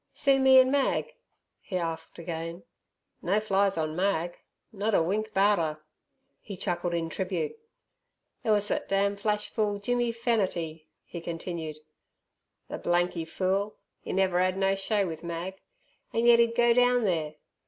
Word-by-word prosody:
"See 275 -2 +4
me 265 0 +7
an' 260 0 +5
Mag?" 285 - +1 0.5
he 185 - -4
asked 165 -2 -4
again. 165 +1 -5 0.6
"No 195 +4 +2
flies 200 -2 +2
on 155 -1 -1
Mag; 175 -2 -1 0.3
not 210 +1 0
a - - +4
wink 215 +5 -1
'bout 205 0 +3
'er!" 155 -2 -2 0.6
He 200 -3 -8
chuckled 175 0 -1
in 165 -1 -1
tribute. 180 -1 -3 0.9
"Ther - - -3
wus 205 -1 +3
thet - - -2
damned 200 +1 +1
flash 210 0 0
fool, 210 -2 0
Jimmy 240 +3 0
Fernatty," 185 -9 -1 0.2
he 170 - -8
continued 165 -2 -5 0.5
" - - -54
ther - - -6
blanky 175 -1 0
fool; 195 +5 -1 0.3
'e - - -5
never 185 -2 +2
'ad 185 +1 +1
no 195 0 +2
show 195 +1 0
with 160 -2 -6
Mag. 170 +3 -5 0.5
An' 230 +1 0
yet 235 -1 +7
'e'd 230 0 +3
go 240 0 +5
down 245 0 +4
there! 160 -6 -1
195 Hz, 160 wpm, -28 LUFS, 170-215 Hz, 0.9 s, me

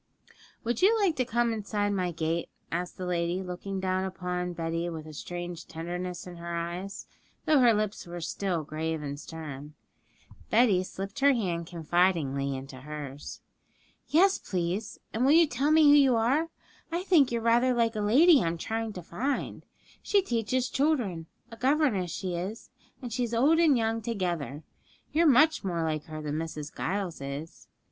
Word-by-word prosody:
'Would 235 0 -1
you 440 +4 +5
like 380 -6 +2
to 255 - +1
come 235 0 +1
inside 205 -1 -1
my 185 -3 0
gate?' 165 +1 -2 0.2
asked 175 +1 -3
the 185 - -4
lady, 175 +1 -1
looking 190 +2 -5
down 185 0 0
upon 180 -1 -3
Betty 165 0 -2
with 160 -2 -6
a 155 - -10
strange 175 +2 -6
tenderness 175 +2 -5
in 180 -1 -9
her 170 0 -5
eyes, 175 +3 -5 0.4
though 305 -2 +5
her 245 -2 +6
lips 215 -3 -1
were 175 0 -6
still 170 0 -2
grave 155 +1 -3
and 145 0 -5
stern. 150 -2 -8 0.7
Betty 215 -5 +4
slipped 195 +2 -6
her 280 0 +5
hand 175 -8 -2
confidingly 165 -5 +1
into 135 0 -9
hers. 145 0 -8 0.7
'Yes, 380 +5 +4
please; 185 +3 -3 0.2
and 225 - 0
will 275 +3 +5
you 335 +1 +7
tell 285 0 0
me 315 0 +6
who 290 -1 +8
you 270 -4 +5
are? 265 +9 +2 0.4
I 345 +2 -1
think 325 -10 +4
you're 235 - 0
rather 240 +2 +4
like 230 -2 +1
a 210 - -1
lady 280 +9 +6
I'm 170 0 -1
trying 225 +4 -3
to 180 - -7
find. 260 +12 -3 0.3
She 400 -2 +2
teaches 245 - 0
children, 240 - 0 0.2
a 230 - -9
governess 255 - +2
she 180 +2 -4
is, 190 +6 -5 0.3
and 240 -3 -5
she's 240 -1 -1
old 295 +8 +4
and 310 -6 +5
young 225 0 0
together. 175 - -3 0.5
You're 330 +3 +4
much 305 +2 +5
more 170 -4 -1
like 155 -2 -2
her 155 -1 -7
than 150 0 -2
Mrs. 155 0 -6
Giles 190 -6 -3
is.' 140 +4 -7
190 Hz, 170 wpm, -28 LUFS, 170-245 Hz, 0.7 s, who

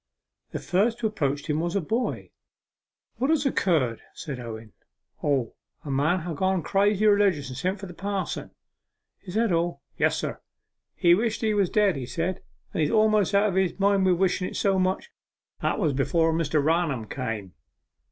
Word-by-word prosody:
The - - -4
first 220 +6 +1
who 235 - -3
approached 145 -10 -1
him 150 -1 0
was 170 +2 -2
a - - +3
boy. 225 +8 -2 0.9
'What 265 +3 0
has 310 -3 +2
occurred?' 155 - +1
said 140 -5 -6
Owen. 110 -3 -8 0.5
'O, 135 -5 0 0.3
a 140 - -4
man 155 +7 +1
ha' 170 0 -4
got 190 +1 0
crazy 205 +3 +2
religious, 200 -9 +3
and 130 - -7
sent 185 +5 -1
for 200 - -7
the 180 - -9
pa'son.' 195 +1 -3 0.7
'Is 185 -1 -9
that 225 -2 +2
all?' 170 -4 0 0.2
'Yes, - - +2
sir. - - -4 0.5
He 170 -1 +5
wished 220 +4 0
he 220 -2 +1
was 200 -4 +2
dead, 205 -7 +2
he 125 -2 -5
said, 180 +4 -2 0.3
and - - 0
he's 150 - +2
almost 215 -2 +3
out 205 +1 +4
of - - -3
his 190 0 0
mind 200 0 +3
wi' 185 - +5
wishen 180 +1 +1
it - - -8
so 195 -1 +2
much. 185 - -1 0.5
That - - 0
was 160 -9 +1
before 160 +4 +2
Mr. 155 -2 +1
Raunham 155 -7 +1
came. 110 -8 -4
180 Hz, 180 wpm, -26 LUFS, 150-205 Hz, 0.9 s, He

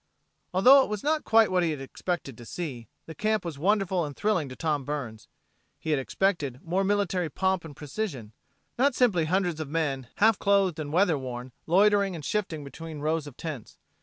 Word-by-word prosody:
Although 255 +10 +7
it - - -1
was 210 -1 -4
not 310 +1 +1
quite 225 -2 +5
what 180 -1 +3
he 170 - +1
had 150 -3 -3
expected 135 0 -4
to 120 - -12
see, 125 -4 -6 0.2
the 160 - -8
camp 215 +1 0
was 155 -5 -5
wonderful 190 0 +1
and 145 -2 -5
thrilling 185 -10 0
to 130 - -8
Tom 150 -2 -1
Burns. 125 -6 -5 0.5
He 160 - -4
had 145 - +2
expected 145 -3 -1
more 180 +4 0
military 190 -4 0
pomp 190 +3 0
and 155 -3 -10
precision; 145 - -5 0.5
not 275 0 +3
simply 195 -10 +3
hundreds 175 -1 0
of 155 -3 -4
men, 140 -5 -1
half 220 0 +4
clothed 195 -5 +2
and 145 -2 -4
weather 175 -3 +3
worn, 125 -1 -6 0.2
loitering 200 +2 +4
and 155 -3 -7
shifting 180 -8 -2
between 160 +3 -8
rows 155 0 -1
of 140 - -11
tents. 150 -9 -7
165 Hz, 195 wpm, -27 LUFS, 145-200 Hz, 0.5 s, Although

